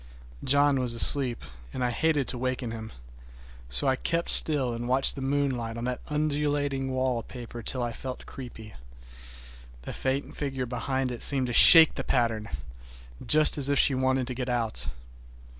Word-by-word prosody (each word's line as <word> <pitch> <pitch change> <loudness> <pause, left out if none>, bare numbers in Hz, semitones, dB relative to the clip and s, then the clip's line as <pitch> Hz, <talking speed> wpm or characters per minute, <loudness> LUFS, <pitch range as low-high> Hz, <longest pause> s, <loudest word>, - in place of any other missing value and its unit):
John 140 0 +1
was 125 -2 -1
asleep 125 0 +7 0.3
and 130 - -6
I 125 - -2
hated 150 +1 -2
to 125 - -3
waken 130 -2 -5
him, 110 -1 -9 0.8
so 65 - 0
I 135 -1 0
kept 170 +5 -2
still 135 -6 +4
and 120 +1 -7
watched 130 +2 +1
the 140 - -10
moonlight 135 -4 -4
on 115 - -7
that 125 0 -5
undulating 145 -2 -3
wallpaper 125 -2 -6
till 125 +3 -4
I 120 - -4
felt 130 +2 -9
creepy. 115 -5 -12 1.1
The - - -9
faint 135 +1 -5
figure 135 -3 -5
behind 130 +1 -5
seemed 135 -2 +2
to 120 - -6
shake 160 +5 +7
the - - -7
pattern, 115 -3 -3 0.7
just 155 -1 +4
as 140 0 -3
if 140 - -1
she 140 - +2
wanted 130 0 -2
to 125 - -7
get 125 +1 -6
out. 115 - -4
130 Hz, 160 wpm, -25 LUFS, 120-140 Hz, 1.1 s, asleep